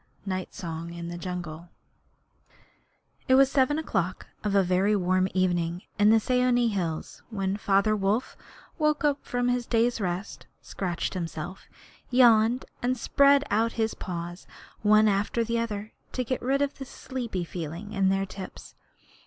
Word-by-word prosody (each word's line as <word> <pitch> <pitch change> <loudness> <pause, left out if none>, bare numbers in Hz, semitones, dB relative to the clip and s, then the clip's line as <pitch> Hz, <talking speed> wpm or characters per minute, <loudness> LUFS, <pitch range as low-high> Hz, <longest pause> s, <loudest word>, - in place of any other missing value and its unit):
Night 185 -1 -3
Song 170 -3 -6
in 170 0 -6
the 175 - -5
Jungle. 175 -2 -6 1.6
It 260 - +5
was 270 0 +5
seven 275 +2 +3
o'clock 190 - -2 0.2
of 205 -1 0
a 195 - +5
very 185 +3 +2
warm 185 -1 +2
evening 175 -1 0 0.2
in 205 +1 +6
the 225 +1 +6
Seeonee 250 0 +2
hills 170 -6 -3
when 195 -3 -1
Father 200 +1 +2
Wolf 205 +4 0 0.4
woke 305 -1 +2
up 290 -1 +1
from 245 0 -1
his 245 -1 0
day's 235 0 +1
rest, 185 +1 -4
scratched 180 -3 -3
himself, 175 +1 -5 0.4
yawned, 240 -1 +5 0.2
and 255 +1 0
spread 280 +3 +4
out 225 +3 +2
his 225 -1 0
paws 175 0 -6 0.3
one 215 +1 +5
after 205 +3 +1
the 230 +1 -1
other 215 -2 -4 0.2
to 255 - -1
get 255 +1 -2
rid 275 +3 +1
of 280 0 -3
the 270 - -5
sleepy 240 -8 -5
feeling 170 +4 -6
in 195 -2 +2
their 195 0 +1
tips. 190 0 -9
205 Hz, 155 wpm, -27 LUFS, 185-245 Hz, 1.6 s, in